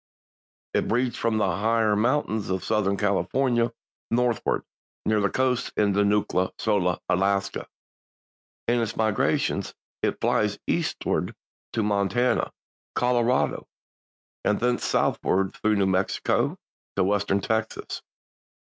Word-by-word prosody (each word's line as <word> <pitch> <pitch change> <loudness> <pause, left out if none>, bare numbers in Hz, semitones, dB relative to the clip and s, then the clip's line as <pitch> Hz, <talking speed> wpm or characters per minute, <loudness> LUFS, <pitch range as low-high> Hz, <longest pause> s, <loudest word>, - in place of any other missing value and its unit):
It - - +1
breeds 120 +1 +1
from 115 -1 0
the 105 - +2
higher 110 0 +2
mountains 110 -2 0
of 95 -1 -1
Southern 100 -3 +1
California 120 +4 +1 0.4
northward, 120 -1 +1 0.4
near 110 -1 +3
the 100 - +2
coast 130 -1 0
to 105 - +4
Nootka 100 -2 +2
Sound, 95 -5 +1
Alaska. 100 +2 0 1.0
In 120 0 +2
its 115 -1 -3
migrations 110 -2 +1 0.3
it - - 0
flies - - +1
eastward - - -1 0.4
to 110 - +1
Montana, 105 +5 +1 0.4
Colorado 125 0 +1 0.8
and 105 - +2
thence 125 +1 +1
southward 95 0 +1
through 110 0 +1
New 100 -1 +2
Mexico 95 0 +1 0.4
to - - +2
Western 100 0 +1
Texas. 110 +2 -2
105 Hz, 110 wpm, -26 LUFS, 100-120 Hz, 1.0 s, to